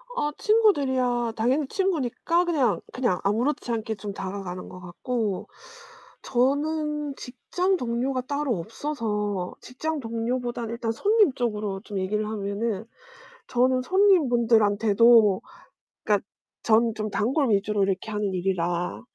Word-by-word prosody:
아 295 -10 0
친구들이야 260 - +2
당연히 260 +6 +1
친구니까 340 0 0
그냥, 280 -11 +1
그냥 240 -8 0
아무렇지 240 +6 0
않게 225 -1 -2
좀 205 0 -6
다가가는 190 -2 -6
것 185 - -10
같고 200 +3 -3 0.8
저는 295 +3 0
직장 360 +10 -1
동료가 250 0 -1
따로 280 -3 -1
없어서 210 - -3
직장 310 +5 -4
동료보다 240 0 -3
일단 230 0 -2
손님 410 - +3
쪽으로 210 -6 -2
좀 205 -2 -5
얘기를 210 +3 -1
하면은 210 0 -3 0.6
저는 255 +1 +2
손님분들한테도 230 - +4 0.6
그니까 205 -2 +1 0.4
전 225 0 +3
좀 215 0 -3
단골 260 +3 +1
위주로 205 0 +1
이렇게 195 +2 -2
하는 210 -2 -1
일이라 175 -1 -1
235 Hz, 280 characters per minute, -25 LUFS, 205-275 Hz, 0.8 s, 손님분들한테도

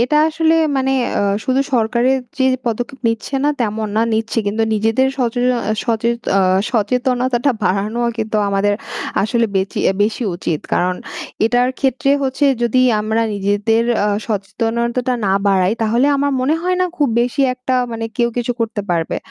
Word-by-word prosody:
এটা 255 +5 +1
আসলে 320 0 +2 0.2
মানে 265 0 +1 0.3
অ - - +1 0.2
শুধু 260 +1 +1
সরকারের 240 +3 +2 0.2
যে 260 - +2 0.2
পদক্ষেপ 245 +4 -3
নিচ্ছে 230 +4 -3
না, - - +3
তেমন 215 -1 -1
না, 225 - +3
নিচ্ছে। 225 +1 -1
কিন্তু 215 +2 0
নিজেদের 225 +5 +2
সচে 245 -1 0 0.4
সচেত 235 0 0 0.2
অ - - +4 0.3
সচেতনতাটা 250 +3 +1
বাড়ানোও 210 +6 0
কিন্তু 220 0 -2
আমাদের 200 +1 +1 0.5
আসলে 230 +3 +1
বেচি 190 0 -1 0.2
বেশি 220 +4 -1
উচিত। 165 -3 -2
কারণ 180 +1 +1 0.5
এটার 245 +2 +2
ক্ষেত্রে 270 0 +1
হচ্ছে 265 +2 0 0.2
যদি 235 +1 +2 0.2
আমরা 220 +2 0
নিজেদের 205 +3 +1 0.2
আ - - +1 0.2
সচেতনতাটা 235 +4 -1
না 190 - +2
বাড়াই 190 -1 +3
তাহলে 235 +5 +2
আমার 285 0 0
মনে 270 +5 +2
হয় 365 0 0
না 365 - +3
খুব 290 -4 +2
বেশি 245 +3 -1
একটা 255 0 -2 0.2
মানে 225 0 -4
কেউ 240 -2 +2
কিছু 245 0 -1
করতে 225 -2 -1
পারবে। 165 -2 -1
235 Hz, 155 wpm, -18 LUFS, 215-255 Hz, 0.5 s, অ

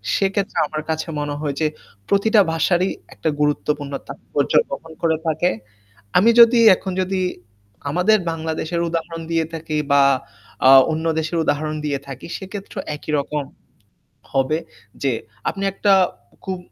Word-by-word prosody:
সেক্ষেত্রে 195 0 0
আমার 155 0 -4
কাছে 160 +1 -2
মনে 145 0 -2
হয় 145 -2 -2
যে 155 - +3 0.4
প্রতিটা 210 +2 +4
ভাষারই 175 +3 +2 0.2
একটা 160 - -2
গুরুত্বপূর্ণ 145 -1 0
তাৎপর্য 140 - -3 0.2
গ্রহণ 160 +4 -7
করে 160 -2 +2
থাকে। 165 +3 +2 0.7
আমি 225 +5 +5
যদি 235 +1 +8 0.2
এখন 190 - -5
যদি 185 0 -1 0.7
আমাদের 195 +7 +3
বাংলাদেশের 160 +1 -3
উদাহরণ 165 0 -4
দিয়ে 165 -1 +1
থাকি 155 -1 -4 0.2
বা 140 -1 +6 0.7
আ - - +9 0.2
অন্য 160 +1 -2
দেশের 160 +2 -1
উদাহরণ 155 +1 -1
দিয়ে 140 -2 -1
থাকি 135 -1 -8
সেক্ষেত্রে 195 +1 -8 0.2
একই 155 - -8
রকম 145 +1 -2 0.9
হবে 135 +4 +1 0.4
যে 135 -2 +2 0.4
আপনি 195 - -4
একটা 200 +1 +2 0.5
খুব 190 -2 -3
160 Hz, 135 wpm, -21 LUFS, 150-190 Hz, 0.9 s, আ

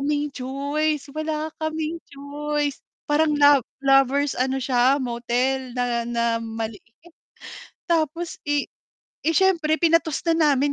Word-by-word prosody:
kaming 290 +1 -1
choice, 285 +3 -2
wala 310 0 -3
kaming 315 +1 -2
choice. 290 +1 -3 0.3
Parang 300 +1 +3
lo 285 -1 +6 0.2
lovers 270 +1 +4
ano 265 +1 +1
siya 255 +1 +3
motel 250 +1 -1
na 240 -1 0
na 235 -1 0
maliit. 225 -2 -5 1.1
Tapos, 330 +1 0
eh 290 -1 +1 0.6
eh, 325 - +2
siyempre 335 -5 +3
pinatos 330 -2 +2
na 320 -3 +4
namin 280 +2 +1
285 Hz, 120 wpm, -23 LUFS, 255-310 Hz, 1.1 s, lo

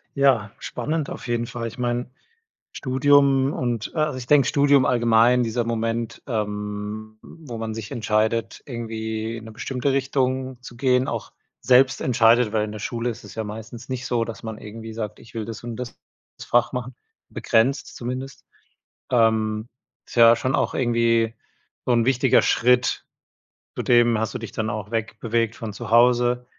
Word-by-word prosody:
Ja, 130 -7 +3
spannend 155 -1 -3
auf - - -7
jeden 120 0 -1
Fall. 115 -1 -4
Ich 115 - -9
meine 120 0 -1 0.6
Studium 140 0 +3
und 120 -3 -3
a 155 -1 +2
also, 145 - -5
ich 125 -1 -7
denke 140 -2 +5
Studium 140 -2 +4
allgemein 120 0 +4
dieser 120 +1 -1
Moment, 115 0 -2
ähm, 105 -1 -4
wo 145 -8 -10
man 110 0 -4
sich 110 -1 -7
entscheidet, 110 +1 0
irgendwie 110 -2 -4
in 110 - -10
'ne 110 - -9
bestimmte 125 +4 -2
Richtung 130 -1 -1
zu 125 - -11
gehen, 130 0 +2
auch - - -4 0.3
selbst 130 +1 +4
entscheidet, 115 -1 +4
weil 110 -1 +2
in 105 - -7
der 105 - -7
Schule 120 +3 -2
ist 115 0 -7
es 100 -3 -12
ja 110 - -2
meistens 110 +3 -8
nicht 130 0 -4
so, 120 -2 0
dass 115 -3 -8
man 110 -1 -5
irgendwie 110 +1 -9
sagt: 105 -2 -5
„Ich 115 - -16
will 110 -2 -3
das 115 +1 -8
und 120 -1 -5
das 125 -2 -7 0.4
Fach 120 +1 +1
machen“, 125 0 -4 0.3
begrenzt 130 +5 +1
zumindest, 130 +2 -6 0.7
ähm, 110 -1 +2 0.4
ist - - -11
ja 115 -1 +8
schon 130 +4 0
auch - - 0
irgendwie 115 -2 +2 0.5
so - - +1
'n 115 -1 +3
wichtiger 130 0 +4
Schritt. 125 +1 +2 0.7
Zudem 120 -2 +3
hast 110 - -2
du - - -2
dich 115 -2 -7
dann 110 -1 -2
auch 105 0 -5
weg 115 -1 -2
bewegt 115 -1 0
von 110 -2 -6
zu - - -7
Hause. 120 +1 +4
115 Hz, 170 wpm, -23 LUFS, 110-125 Hz, 0.7 s, ja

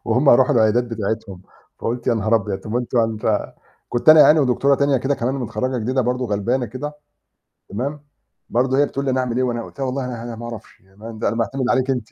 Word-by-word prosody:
وهُم 125 +5 +3
يرُوحوا 125 +1 +5
العيادات 115 +2 +3
بتاعتهم، 110 -4 -4 0.4
فقُلت: 120 +1 -4
"يا 120 - +3
نهار 110 +1 +1
أبيض! 100 -2 -3
طَب 110 - -8
ما 120 - +1
أنتم 125 0 -2
يعني 115 -1 +1
ف" - - -5 0.7
كنت 120 +5 0
أنا 155 0 +10
يعني 155 +1 +7
ودكتورة 135 +1 +2
تانية 140 0 +2
كده 135 +3 0
كمان 125 +2 -2
متخرّجة 130 0 -2
جديدة 130 +4 0
برضه، 125 +1 -1
غلبانة 115 +5 -1
كده، 130 +7 -6 0.8
تمام، 140 +8 -4 0.5
برضه 130 +3 +1
هي 145 - +4
بتقول 140 0 -4
لي: 135 - +1
"أنا 130 - 0
أعمل 125 -2 -2
إيه؟" 130 - +2
وأنا 120 -2 -2
قُلت - - -13
لها: 135 - -1
"والله 130 0 -2
أنا 120 -2 -6
أنا 120 -1 -6
ما 120 - -8
أعرفش، 115 -2 -9
يعني 95 +2 -21
أنا 115 0 -3
معتمد 125 +2 -1
عليكِ 130 0 +1
أنتِ." 125 -4 -2
120 Hz, 230 wpm, -20 LUFS, 115-130 Hz, 0.8 s, أنا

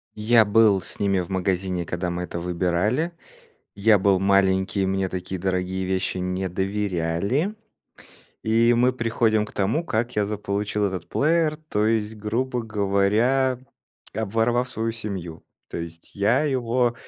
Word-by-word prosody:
Я 110 +1 +4
был 105 -2 +4
с - - -7
ними 100 -2 +2
в 90 - -6
магазине 95 -1 -1
когда 90 +1 -2
мы 90 +1 -3
это 85 - -5
выбирали. 90 - 0 0.6
Я 105 +1 +4
был 95 -1 +3
маленький, 95 0 +2
мне 95 0 0
такие 95 0 -5
дорогие 95 0 -1
вещи 95 0 -1
не 90 +1 -2
доверяли. 95 - -1 0.9
И 115 +2 +3
мы 125 +2 +3
приходим 115 -3 +1
к - - -12
тому, 110 - 0
как 120 -4 -1
я 105 -1 +2
заполучил 105 0 -2
этот 95 -4 -3
плеер, 155 0 +2
то 150 -9 -1
есть, 110 -1 0
грубо 120 +4 -2
говоря, 110 +5 +1 0.6
обворовав 115 +4 0
свою 115 0 -2
семью. 95 -7 -6 0.3
То - - -5
есть, 85 0 -9
я 105 +7 +2
его, 125 -4 +1
105 Hz, 140 wpm, -24 LUFS, 95-115 Hz, 0.9 s, Я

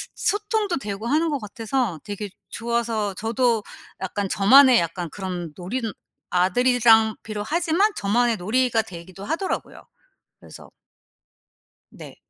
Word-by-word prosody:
소통도 420 - 0
되고 210 -3 -5
하는 315 +5 +2
것 285 - -1
같아서 225 - -2
되게 205 0 -5 0.2
좋아서 230 -3 -2
저도 230 +1 0 0.4
약간 195 +1 -2
저만의 255 +5 +7
약간 170 0 -3
그런 180 -5 -5
놀이는 220 +5 -4 0.4
아들이랑 225 +4 +4
비록 210 -1 -5
하지만 345 +5 +2
저만의 230 +3 +1
놀이가 230 +4 +1
되기도 185 -1 -11
하더라고요. 335 - -3 0.6
그래서 - - -13 1.2
네. - - -12
225 Hz, 280 characters per minute, -23 LUFS, 200-255 Hz, 1.2 s, 저만의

